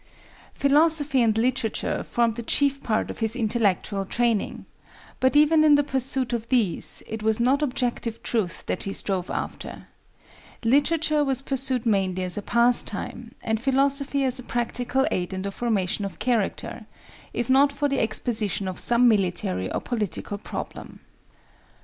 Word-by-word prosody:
Philosophy 290 -1 +3
and 220 -2 +2
literature 240 -1 -1
formed 235 -2 0
the 235 - -5
chief 275 +4 +1
part 215 -1 -1
of - - -10
his 225 0 0
intellectual 210 -4 0
training; 230 +1 -1 0.5
but 260 +2 +2
even 305 +1 +5
in 300 -1 +6
the 290 - +3
pursuit 265 -2 0
of 230 -1 -3
these, 225 -10 0
it 220 0 -6
was 220 +1 +1
not 260 +5 +2
objective 245 -4 -2
truth 210 -8 -2
that - - -3
he 195 - -4
strove 185 -3 -2
after,—literature 295 +5 -2
was 270 -1 +1
pursued 265 -3 0
mainly 190 -4 0
as 180 -1 +1
a 205 - -3
pastime, 235 0 +1
and 220 -1 -1
philosophy 275 +1 +1
as 260 0 0
a - - -8
practical 245 +2 -1
aid 180 +1 -2
in 190 - -4
the 200 - -3
formation 205 -3 -1
of 195 - -6
character, 235 -6 -2 0.4
if 240 - -3
not 275 +2 +4
for 290 +1 -1
the 275 -1 -1
exposition 215 -3 -1
of 185 - -5
some 240 +1 +4
military 175 - 0
or - - -1
political 210 -3 -4
problem. - - -8
240 Hz, 150 wpm, -24 LUFS, 215-270 Hz, 0.5 s, in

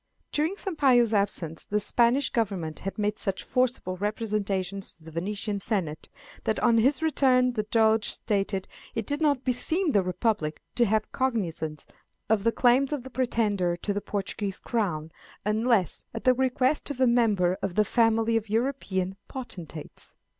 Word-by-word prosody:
During 315 +6 0
Sampayo's 265 - +3
absence 190 -6 0
the 210 - 0
Spanish 240 +6 +2
Government 190 -9 -2
had 195 - -5
made 210 0 -1
such 195 -2 -2
forcible 250 -7 0
representations 200 -2 -2
to 165 - -22
the 160 - -11
Venetian 200 +5 -3
Senate, 180 -7 -2 0.3
that 220 - 0
on 235 -2 +4
his 270 +7 +2
return 255 -5 +3
the 220 - 0
Doge 220 -1 +3
stated 195 -2 -1 0.3
"it 225 -2 -2
did 290 +6 -2
not 285 -4 +2
beseem 315 +7 0
the 205 - +4
Republic 180 -4 -1
to 240 - +3
take 215 +1 0
cognizance 170 - -2 0.5
of 215 -3 +3
the 230 - +3
claims 255 +4 +3
of 290 -5 -2
the 265 - -10
pretender 210 -8 0
to 205 +3 -2
the 205 - -2
Portuguese 200 -1 -3
Crown, 170 -9 -2 0.3
unless 215 -2 +1
at 225 - -5
the 255 - +5
request 260 +3 +1
of 285 -3 -5
a 260 - +5
member 215 -7 +3
of 190 -3 -3
the 215 - +4
family 225 0 +2
of 225 -2 -1
European 205 -6 -1
potentates." 175 - -8
220 Hz, 160 wpm, -27 LUFS, 195-250 Hz, 0.5 s, the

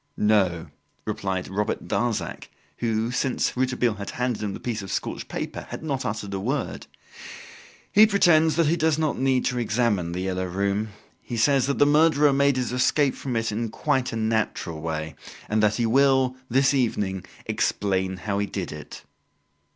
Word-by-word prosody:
"No," 95 -6 +2 0.4
replied 95 -2 -2
Robert 105 +3 -2
Darzac, 120 -2 -2 0.3
who, 115 0 -1
since 125 0 0
Rouletabille 125 -2 +1
had 100 -1 -6
handed 125 -3 -2
him 105 -2 -3
the - - -8
piece 115 -3 -3
of 95 - -7
scorched - - -3
paper, - - -5
had - - -7
not 135 -4 -2
uttered 105 -2 -4
a 95 - -2
word, 130 +8 -3 1.0
"He 215 +2 +7
pretends 165 -6 +4
that 165 0 +3
he 165 +3 +2
does 160 -2 +2
not 155 -2 -1
need 130 -1 +2
to 125 -1 0
examine 105 -6 0
"The 90 - -3
Yellow 95 0 -2
Room". 100 +3 -1 0.3
He 120 - -5
says 135 +3 +3
that 140 - 0
the 145 - +5
murderer 150 -1 +4
made 140 -1 +3
his 125 -2 -1
escape 130 +2 +2
from 130 -3 -5
it 115 0 0
in 115 +2 -2
quite 125 +3 0
a - - -4
natural 110 -7 -1
way, 80 -1 -3 0.3
and 110 0 +1
that 105 0 +3
he 120 - 0
will, 130 +1 +3
this 135 +3 +3
evening, 105 -8 0 0.2
explain 95 -2 0
how 100 0 -2
he 100 - -1
did 95 -2 -4
it." 75 0 -9
115 Hz, 175 wpm, -25 LUFS, 100-135 Hz, 1.0 s, He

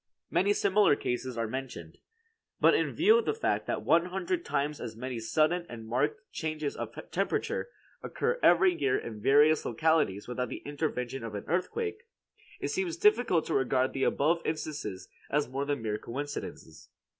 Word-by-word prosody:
Many 200 +2 +3
similar 200 -5 +4
cases 125 -1 -3
are 115 - 0
mentioned. 120 -10 -6 0.6
But - - +6
in - - +1
view 440 +2 +5
of - - -3
the - - 0
fact 450 - -1
that - - -2
one 170 +1 +4
hundred 190 - -2
times 145 +2 -2
as 115 -2 -6
many 125 +1 -5
sudden 155 +9 +1
and 115 -2 -8
marked 135 - 0
changes 155 -2 -3
of - - -6 0.2
temperature - - -1 0.3
occur 480 +2 -1
every 180 +1 +5
year 140 -6 +1
in 110 -3 -7
various 145 +5 +5
localities 120 -6 +1
without 125 0 -3
the - - -7
intervention 135 -4 -3
of 110 -2 -5
an 100 - -5
earthquake, 430 - -2 0.5
it - - -2
seems 360 -3 -2
difficult 245 - +3
to - - -2
regard 130 0 +1
the 135 - -1
above 165 +4 +2
instances 150 -11 -4 0.2
as 150 0 +1
more 135 +3 -3
than 140 -5 -2
mere 105 -1 -2
coincidences. 130 - -7
145 Hz, 170 wpm, -30 LUFS, 125-175 Hz, 0.6 s, But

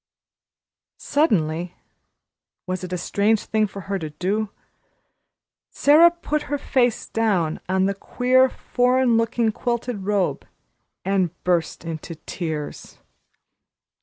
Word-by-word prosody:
Suddenly 175 - 0 0.9
was 185 0 -3
it 180 - -6
a 180 - -1
strange 205 +4 +1
thing 215 -1 +1
for 195 0 -8
her 195 +2 -3
to 155 -3 -5
do? 195 +7 -2 1.2
Sara 310 +4 +6
put 335 -3 -3
her 290 - 0
face 250 -4 +1
down 190 -8 0
on 190 0 +2
the 200 - +1
queer, 255 +5 +2
foreign 250 -1 +1
looking 230 0 +1
quilted 235 -3 -3
robe 205 -3 0 0.6
and 185 -3 0
burst 175 -2 0
into 165 0 -6
tears. 160 -2 -6
200 Hz, 110 wpm, -23 LUFS, 180-245 Hz, 1.2 s, Sara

